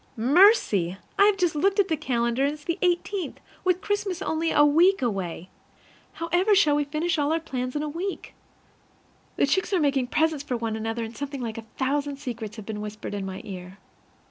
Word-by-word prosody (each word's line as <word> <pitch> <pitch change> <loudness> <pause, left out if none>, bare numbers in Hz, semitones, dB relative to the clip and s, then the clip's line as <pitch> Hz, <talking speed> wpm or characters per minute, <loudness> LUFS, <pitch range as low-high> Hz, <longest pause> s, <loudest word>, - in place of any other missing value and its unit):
Mercy! 235 - +4 0.2
I've 405 0 +5
just 355 -4 +1
looked 390 +7 +2
at 395 - +4
the 320 - +1
calendar, 235 -2 0
and 285 +1 +1
it's 300 0 -11
the 335 +1 -2
eighteenth, 355 -1 -1 0.2
with 365 0 +1
Christmas 405 -3 -2
only 320 +1 0
a 295 - +5
week 345 +7 +4
away. 185 -6 -3 0.7
However 355 +5 +2
shall 305 -7 +4
we 295 0 +1
finish 315 +3 -1
all 290 +1 +1
our 325 - +2
plans 255 -5 -4
in 295 - -1
a - - -2
week? 350 +6 -5 1.0
The - - +3
chicks 380 +8 0
are 370 - +3
making 275 -4 +1
presents 310 +1 +1
for 255 -4 -2
one 225 -1 -3
another, 225 +1 -3
and 225 +1 -7
something 285 -1 -5
like 230 -2 -4
a 225 - -12
thousand 280 +1 -1
secrets 230 -5 -6
have 215 -3 -9
been 210 -1 -5
whispered 210 0 -6
in 200 -1 -3
my 190 0 -6
ear. 185 -1 -8
290 Hz, 195 wpm, -25 LUFS, 230-345 Hz, 1.0 s, I've